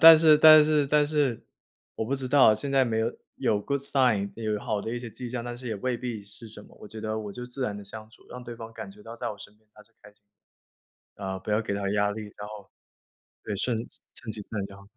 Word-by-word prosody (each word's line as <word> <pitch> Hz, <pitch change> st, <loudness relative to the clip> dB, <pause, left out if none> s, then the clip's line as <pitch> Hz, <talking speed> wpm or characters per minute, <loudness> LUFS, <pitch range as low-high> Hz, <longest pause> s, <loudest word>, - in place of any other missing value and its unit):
但 165 Hz, -1 st, +11 dB
是 155 Hz, -1 st, +7 dB
但 155 Hz, 0 st, +10 dB
是 150 Hz, -2 st, +3 dB
但 150 Hz, +1 st, +4 dB
是， 145 Hz, -6 st, 0 dB, 0.5 s
我 -, -, -2 dB
不 130 Hz, +5 st, -1 dB
知 130 Hz, -2 st, -4 dB
道， 130 Hz, -6 st, +7 dB
现 135 Hz, +6 st, -4 dB
在 135 Hz, -1 st, +4 dB
没 110 Hz, -2 st, 0 dB
有， 115 Hz, +1 st, +1 dB, 0.3 s
有 115 Hz, -6 st, +1 dB
good 140 Hz, +4 st, -1 dB
sign 125 Hz, -8 st, +2 dB
有 110 Hz, -2 st, -1 dB
好 110 Hz, -4 st, -1 dB
的 115 Hz, +2 st, -3 dB
一 -, -, -2 dB
些 120 Hz, -, -7 dB
迹 125 Hz, +2 st, -7 dB
象， 125 Hz, -2 st, -3 dB
但 120 Hz, 0 st, -5 dB
是 125 Hz, 0 st, -9 dB
也 110 Hz, -, -2 dB
未 125 Hz, +4 st, -1 dB
必 120 Hz, -4 st, -5 dB
是 100 Hz, +3 st, -12 dB
什 105 Hz, -1 st, -6 dB
么， -, -, -18 dB
我 -, -, -9 dB
觉 110 Hz, +1 st, -8 dB
得 110 Hz, 0 st, -2 dB
我 105 Hz, -2 st, -6 dB
就 125 Hz, +3 st, -7 dB
自 130 Hz, +2 st, -6 dB
然 105 Hz, -4 st, -2 dB
地 105 Hz, -, -8 dB
相 110 Hz, +2 st, -9 dB
处， -, -, -20 dB
让 125 Hz, 0 st, -8 dB
对 120 Hz, -, -7 dB
方 115 Hz, 0 st, -9 dB
感 125 Hz, -, -7 dB
觉 210 Hz, +1 st, -15 dB
到 115 Hz, -, -9 dB
在 -, -, -3 dB
我 105 Hz, -, -8 dB
身 105 Hz, -, -12 dB
边 110 Hz, 0 st, -35 dB
她 105 Hz, -, -15 dB
是 115 Hz, +2 st, -29 dB
开 105 Hz, -, -14 dB
心 105 Hz, -, -38 dB, 1.0 s
的。 100 Hz, -, -8 dB
呃， 95 Hz, 0 st, -3 dB
不 95 Hz, -, -6 dB
要 105 Hz, +2 st, +2 dB
给 105 Hz, -, -3 dB
她 100 Hz, -1 st, -1 dB
压 105 Hz, 0 st, +2 dB
力， 110 Hz, +1 st, -5 dB
然 105 Hz, 0 st, -7 dB
后。 105 Hz, -2 st, -10 dB, 0.7 s
对， 105 Hz, -, -4 dB
顺 115 Hz, +3 st, 0 dB, 0.4 s
顺 110 Hz, -, -3 dB
其 105 Hz, -, -6 dB
自 -, -, -14 dB
然 105 Hz, -3 st, -2 dB
就 100 Hz, -, -12 dB
好。 100 Hz, -, -14 dB
115 Hz, 320 characters per minute, -27 LUFS, 105-130 Hz, 1.0 s, 但